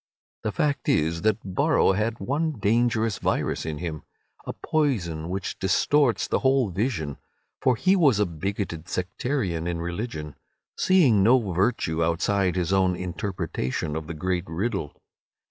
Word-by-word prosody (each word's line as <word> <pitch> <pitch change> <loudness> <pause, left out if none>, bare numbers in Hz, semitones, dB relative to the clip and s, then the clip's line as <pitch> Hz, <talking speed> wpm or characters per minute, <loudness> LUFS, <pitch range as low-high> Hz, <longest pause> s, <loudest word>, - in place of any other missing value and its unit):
The 110 - -2
fact 140 +8 0
is 80 +2 +1
that 110 -1 +2 0.2
Borrow 95 - +3
had 110 +4 -1
one 150 +9 -1
dangerous 115 -1 +1
virus - - -1
in 75 -1 -3
him—a 80 -2 -8
poison 90 - -1
which 95 +2 -4
distorts 125 +7 +2
the - - +1
whole 130 -5 +2
vision—for 100 - -2
he 190 - +3
was 145 - +4
a 105 - +3
bigoted 85 0 -4
sectarian 90 - -2
in 85 -1 -2
religion, 85 -3 -4 0.4
seeing 150 - +4
no 120 +6 +6 0.2
virtue 85 -4 +1
outside 90 +3 +1
his 90 +1 0
own 95 -1 +3
interpretation 85 -5 -3
of 80 -1 -4
the 85 - -5
great 90 +2 -1
riddle. 85 -2 -3
95 Hz, 135 wpm, -25 LUFS, 85-115 Hz, 0.4 s, no